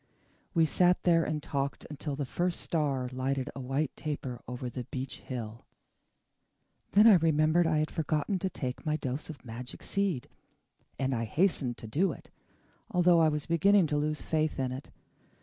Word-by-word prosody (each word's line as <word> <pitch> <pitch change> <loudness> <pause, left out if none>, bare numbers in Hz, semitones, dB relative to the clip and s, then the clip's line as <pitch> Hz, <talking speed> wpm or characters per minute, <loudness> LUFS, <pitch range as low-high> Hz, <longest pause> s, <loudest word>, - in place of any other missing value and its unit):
We 165 -1 +5
sat 180 +3 +3
there 165 -2 +4
and 150 -2 -2
talked 140 -2 -3
until 145 0 -4
the 140 0 -2
first 175 +6 -1
star 140 -6 0
lighted 130 +1 -1
a - - -6
white 135 +2 -1
taper 135 -5 -4
over 125 0 -5
the 125 0 -5
beech 130 0 -5
hill. 115 -3 -7 1.3
Then 210 +2 +7
I 215 -5 +9
remembered 160 +1 +3
that 160 - +2
I - - +3
had 155 0 0
forgotten 160 +4 -1
to 190 - -1
take 130 -7 -5
my 155 -1 0
dose 135 +1 -4
of 150 -4 -9
magic 120 +2 -8
seed, 195 -10 -1 0.7
and 135 0 0
I 115 -1 -1
hastened 135 - +1
to 115 - -9
do 165 - +1
it, - - -14 0.6
although 175 -1 +4
I 160 -1 +5
was 150 -1 -2
beginning 190 +3 +4
to - - +2
lose 150 +1 -1
faith 155 -1 0
in 130 -1 0
it. 130 +2 -7
150 Hz, 180 wpm, -30 LUFS, 130-165 Hz, 1.3 s, I